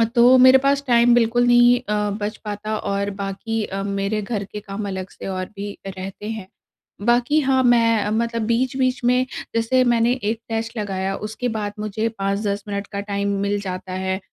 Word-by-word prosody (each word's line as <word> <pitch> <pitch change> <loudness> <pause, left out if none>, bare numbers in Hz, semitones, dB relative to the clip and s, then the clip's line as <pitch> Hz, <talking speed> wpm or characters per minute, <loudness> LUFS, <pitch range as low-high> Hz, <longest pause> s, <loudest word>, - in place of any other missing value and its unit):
तो 245 +2 +7
मेरे 260 +1 +8
पास 275 +1 +1
टाइम 240 0 +5
बिल्कुल 240 +1 +3
नहीं 240 0 +6
अ, 210 0 0
बच 210 +1 -3
पाता 210 +1 -3
और 200 0 -2
बाक़ी 215 +3 -3
अ, 195 0 -4
मेरे 200 +2 -1
घर 205 -1 -3
के 210 - -5
काम 205 0 -6
अलग 190 -1 -5
से - - -9
और 185 -1 -3
भी 200 0 -6
रहते 195 +2 -7
हैं। 220 -4 -5 0.6
बाक़ी 245 +6 +3
हाँ, 260 -1 +2
मैं 230 -4 +3
मतलब 230 0 -1
बीच-बीच 255 +1 0
में 250 +1 +3 0.3
जैसे 255 +3 +3
मैंने 240 -1 +3
1 220 +2 -1
टेस्ट 225 +1 -3
लगाया 195 -2 -2
उसके 235 +3 -4
बाद 205 -1 -3
मुझे 215 +1 -2
5-10 200 +1 -1
मिनट 200 -1 -4
का 200 - -3
टाइम 200 0 -2
मिल 200 0 0
जाता 185 -1 -5
है, 190 0 -2
215 Hz, 180 wpm, -21 LUFS, 200-240 Hz, 0.6 s, मेरे